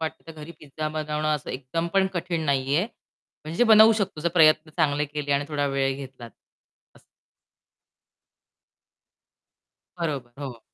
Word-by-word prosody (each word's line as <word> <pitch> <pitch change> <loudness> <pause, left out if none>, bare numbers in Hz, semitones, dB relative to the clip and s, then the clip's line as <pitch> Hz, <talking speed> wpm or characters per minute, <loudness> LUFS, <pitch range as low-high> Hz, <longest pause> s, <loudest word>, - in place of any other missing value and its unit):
वाटतं 160 0 -5
तर 165 - -9
घरी 165 +3 -9
पिझ्झा 155 +1 -5
बनवणं 155 0 -3
असं 150 - -5
एकदम 140 +6 -3
पण 195 -1 +4
कठीण 175 -1 -2
नाहीये. 140 +4 +1 0.6
म्हणजे 165 +10 +1
बनवू 220 0 +7
शकतो, 200 -7 -2
जर 170 - +1
प्रयत्न 155 -1 +5
चांगले 150 -2 +1
केले 145 0 -3
आणि 140 +1 +1
थोडा 145 -2 -1
वेळ 135 -1 0
घेतलात 130 -4 -10 0.7
असं. - - -20 3.0
बरोबर, 140 -7 -3
हो. 125 -5 -7
150 Hz, 135 wpm, -25 LUFS, 140-165 Hz, 3.0 s, बनवू